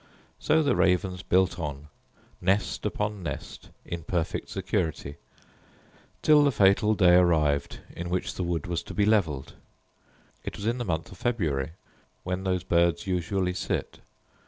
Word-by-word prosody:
So 160 Hz, 0 st, +3 dB
the 140 Hz, -4 st, +2 dB
ravens 90 Hz, 0 st, +1 dB
built 95 Hz, 0 st, +2 dB
on, 75 Hz, -2 st, -5 dB, 0.5 s
nest 95 Hz, +3 st, 0 dB
upon 105 Hz, -1 st, -3 dB
nest, 85 Hz, -, -7 dB, 0.2 s
in 85 Hz, 0 st, -5 dB
perfect 85 Hz, 0 st, -2 dB
security, 85 Hz, -7 st, -2 dB, 1.1 s
till 150 Hz, -1 st, +6 dB
the 140 Hz, -, +4 dB
fatal 105 Hz, 0 st, +4 dB
day 90 Hz, -4 st, +5 dB
arrived 80 Hz, -5 st, +2 dB
in 85 Hz, +1 st, -5 dB
which 90 Hz, +1 st, -2 dB
the -, -, -5 dB
wood 85 Hz, -3 st, -2 dB
was 85 Hz, -1 st, -2 dB
to -, -, -7 dB
be 100 Hz, -, +3 dB
levelled. 80 Hz, -11 st, +1 dB, 0.9 s
It -, -, -6 dB
was 100 Hz, -, -6 dB
in 120 Hz, +3 st, 0 dB
the 120 Hz, -, -2 dB
month 80 Hz, -3 st, -2 dB
of 95 Hz, -, -13 dB
February, 80 Hz, -, -1 dB, 0.5 s
when 90 Hz, +1 st, -3 dB
those 90 Hz, -1 st, 0 dB
birds 85 Hz, +5 st, +2 dB
usually 90 Hz, 0 st, -1 dB
sit. -, -, -3 dB
90 Hz, 150 wpm, -27 LUFS, 85-100 Hz, 1.1 s, till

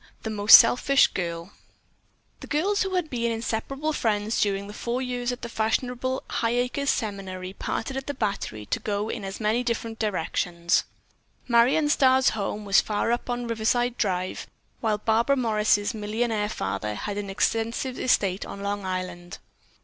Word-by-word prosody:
THE 220 Hz, -, -3 dB
MOST 210 Hz, 0 st, +9 dB
SELFISH 250 Hz, +4 st, +4 dB
GIRL 170 Hz, 0 st, -4 dB, 0.9 s
The -, -, -10 dB
girls 385 Hz, +8 st, +1 dB
who 385 Hz, -1 st, -1 dB
had 350 Hz, -4 st, -1 dB
been 235 Hz, -2 st, -1 dB
inseparable 235 Hz, +7 st, -2 dB
friends 215 Hz, -3 st, 0 dB
during 200 Hz, -1 st, 0 dB
the 205 Hz, -, -9 dB
four 235 Hz, +3 st, -3 dB
years 250 Hz, -1 st, -2 dB
at 245 Hz, -, -7 dB
the -, -, -3 dB
fashionable 245 Hz, +3 st, -1 dB
Highacres 245 Hz, +4 st, -1 dB
Seminary 190 Hz, -3 st, -3 dB
parted 225 Hz, +5 st, -4 dB
at 270 Hz, 0 st, -5 dB
the 285 Hz, -, -3 dB
Battery 195 Hz, -, -3 dB
to -, -, -2 dB
go 210 Hz, +1 st, -2 dB
in 215 Hz, -, -4 dB
as 195 Hz, 0 st, -6 dB
many 220 Hz, +2 st, +1 dB
different 230 Hz, -2 st, -3 dB
directions. 175 Hz, -4 st, 0 dB, 0.6 s
Marion 250 Hz, +6 st, +4 dB
Starr's 265 Hz, -2 st, +4 dB
home 210 Hz, 0 st, -3 dB
was 195 Hz, -1 st, +5 dB
far 215 Hz, +2 st, -1 dB
up 240 Hz, +1 st, -2 dB
on 245 Hz, 0 st, -2 dB
Riverside 235 Hz, +2 st, 0 dB
Drive, 185 Hz, -3 st, -1 dB, 0.3 s
while 220 Hz, -2 st, 0 dB
Barbara 225 Hz, +6 st, +2 dB
Morris' 215 Hz, -3 st, +2 dB
millionaire 215 Hz, 0 st, -1 dB
father 105 Hz, -, -3 dB
had 205 Hz, -, -4 dB
an 200 Hz, -1 st, -5 dB
extensive 225 Hz, +5 st, -1 dB
estate 195 Hz, -6 st, +1 dB
on 200 Hz, -, -8 dB
Long 200 Hz, 0 st, -2 dB
Island. 185 Hz, -1 st, -5 dB
220 Hz, 155 wpm, -25 LUFS, 200-245 Hz, 0.9 s, MOST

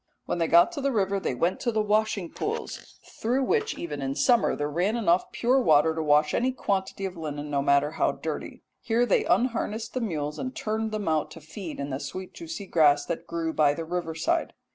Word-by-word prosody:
"When -, -, -2 dB
they 165 Hz, -, +2 dB
got 170 Hz, -, +6 dB
to 305 Hz, -5 st, -5 dB
the 275 Hz, 0 st, +1 dB
river 200 Hz, -3 st, +1 dB
they 135 Hz, -, -2 dB
went 170 Hz, +8 st, 0 dB
to 240 Hz, -, 0 dB
the 220 Hz, -, 0 dB
washing 210 Hz, -4 st, 0 dB
pools, -, -, -5 dB, 0.2 s
through 250 Hz, +4 st, +1 dB
which 440 Hz, -, 0 dB
even 150 Hz, -4 st, -5 dB
in 135 Hz, 0 st, -2 dB
summer 240 Hz, -, +3 dB
there 145 Hz, -, -2 dB
ran 175 Hz, +9 st, 0 dB
enough 185 Hz, -6 st, +2 dB
pure 255 Hz, +3 st, +2 dB
water 160 Hz, -5 st, +4 dB
to 160 Hz, -, -3 dB
wash 150 Hz, 0 st, +3 dB
any 255 Hz, +2 st, +1 dB
quantity 195 Hz, -5 st, -2 dB
of 190 Hz, -1 st, -5 dB
linen, 150 Hz, -2 st, -5 dB
no 140 Hz, -1 st, +1 dB
matter 140 Hz, +1 st, +3 dB
how 160 Hz, -, +1 dB
dirty. -, -, -6 dB, 0.2 s
Here 235 Hz, +1 st, +1 dB
they -, -, +2 dB
unharnessed 230 Hz, -2 st, 0 dB
the 255 Hz, -, -2 dB
mules 155 Hz, -8 st, -3 dB
and 255 Hz, 0 st, -4 dB
turned 220 Hz, 0 st, -2 dB
them 215 Hz, -3 st, -3 dB
out 155 Hz, -1 st, +1 dB
to -, -, -11 dB
feed 160 Hz, +2 st, -8 dB
in 140 Hz, 0 st, -4 dB
the 130 Hz, -, -3 dB
sweet 185 Hz, +7 st, -7 dB
juicy 325 Hz, -11 st, -7 dB
grass 150 Hz, -5 st, +4 dB
that 165 Hz, -, -4 dB
grew 165 Hz, -1 st, -2 dB
by 145 Hz, -1 st, +3 dB
the 165 Hz, -, -5 dB
river 170 Hz, -1 st, -3 dB
side. 160 Hz, -, 0 dB
175 Hz, 220 wpm, -27 LUFS, 150-225 Hz, 0.2 s, got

